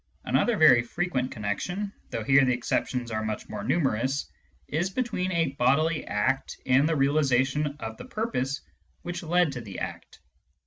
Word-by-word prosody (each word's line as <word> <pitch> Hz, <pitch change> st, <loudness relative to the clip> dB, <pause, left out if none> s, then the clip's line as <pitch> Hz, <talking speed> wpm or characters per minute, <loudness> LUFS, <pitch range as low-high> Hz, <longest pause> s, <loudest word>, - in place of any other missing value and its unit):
Another 240 Hz, -3 st, +2 dB
very 155 Hz, -8 st, +7 dB
frequent 130 Hz, 0 st, -2 dB
connection 180 Hz, -, -3 dB, 0.2 s
(though 115 Hz, -, -3 dB
here 140 Hz, +3 st, +5 dB
the 125 Hz, -1 st, +3 dB
exceptions 120 Hz, 0 st, -2 dB
arc 110 Hz, 0 st, -1 dB
much 110 Hz, 0 st, -4 dB
more 105 Hz, -1 st, -6 dB
numerous) 135 Hz, 0 st, 0 dB, 0.4 s
is 170 Hz, +5 st, -1 dB
between 195 Hz, -4 st, -2 dB
a 165 Hz, -4 st, +1 dB
bodily 155 Hz, +6 st, +2 dB
act 130 Hz, +6 st, 0 dB
and 135 Hz, +4 st, +4 dB
the 165 Hz, -, +1 dB
realisation 140 Hz, 0 st, +2 dB
of 110 Hz, -3 st, -6 dB
the -, -, -9 dB
purpose 145 Hz, -, -2 dB, 0.4 s
which 175 Hz, 0 st, -4 dB
led 175 Hz, -1 st, +2 dB
to 125 Hz, -3 st, -5 dB
the 100 Hz, -4 st, -8 dB
act. -, -, -6 dB
140 Hz, 160 wpm, -27 LUFS, 120-170 Hz, 0.4 s, very